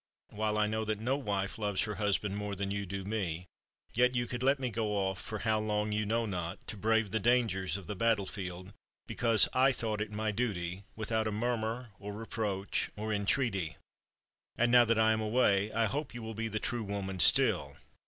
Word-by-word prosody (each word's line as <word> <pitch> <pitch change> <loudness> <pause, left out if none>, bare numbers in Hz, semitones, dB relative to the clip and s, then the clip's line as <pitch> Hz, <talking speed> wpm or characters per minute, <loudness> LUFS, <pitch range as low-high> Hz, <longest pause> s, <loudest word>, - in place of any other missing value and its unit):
While 105 0 -1
I 105 - +3
know 110 +1 -1
that 110 -1 -1
no 125 +5 0
wife 100 -7 -2
loves 105 -3 0
her 105 - -3
husband 105 -1 0
more 105 0 -3
than 100 +1 -3
you 100 -1 -3
do 95 +1 -5
me, 90 -5 -2 0.5
yet 125 +2 +3
you 120 0 +1
could 120 +1 -5
let 135 +2 +3
me 130 -2 -2
go 110 -1 -1
off, 95 -2 -1
for 110 - -5
how 110 0 +1
long 105 0 -1
you 105 0 0
know 115 +2 +1
not, 90 -3 -4
to - - -4
brave 110 0 +1
the 110 - +1
dangers 105 -5 +2
of 100 - -9
the 105 - -5
battlefield, 95 -3 -1 0.3
because 115 -4 +4
I 130 +1 +5
thought 110 -4 -2
it 105 0 -3
my 110 +1 -1
duty, 100 -5 -3
without 110 0 -1
a - - -1
murmur 115 +1 -2
or 105 0 -6
reproach 105 -2 -2
or 110 +1 -2
entreaty. 100 - 0 0.8
And 120 0 +3
now 120 -1 +7
that 115 0 +2
I 110 0 +4
am 110 0 +1
away, 105 -2 +2
I 115 +1 +2
hope 140 +3 -3
you 120 - -6
will 110 0 -5
be 115 +1 -3
the 110 -1 -3
true 120 +1 -2
woman 100 -2 -4
still. - - +5
110 Hz, 205 wpm, -32 LUFS, 100-115 Hz, 0.8 s, now